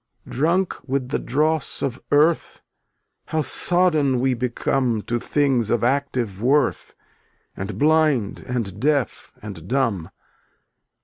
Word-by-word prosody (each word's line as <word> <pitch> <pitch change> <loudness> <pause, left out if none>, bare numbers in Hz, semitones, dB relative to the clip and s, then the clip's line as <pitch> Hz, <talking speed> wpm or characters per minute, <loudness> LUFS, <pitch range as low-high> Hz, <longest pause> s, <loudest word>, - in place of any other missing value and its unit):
300 - - -9
Drunk 175 +5 +1
with 130 -1 -2
the - - -1
dross 155 +3 -1
of 130 -3 -3
earth, 155 +3 +2 0.6
How 155 - -1
sodden 150 -2 +3
we 130 +1 +1
become 120 -1 -1
To 120 0 -2
things 130 -5 +1
of 120 -2 +1
active 125 -8 -1
worth, 135 +2 +1 0.6
And 100 +3 -5
blind 150 -8 +2
and 110 -6 -3
deaf 140 -2 -1
and 95 -6 -9
dumb. 115 -9 -1
130 Hz, 120 wpm, -22 LUFS, 115-150 Hz, 0.6 s, sodden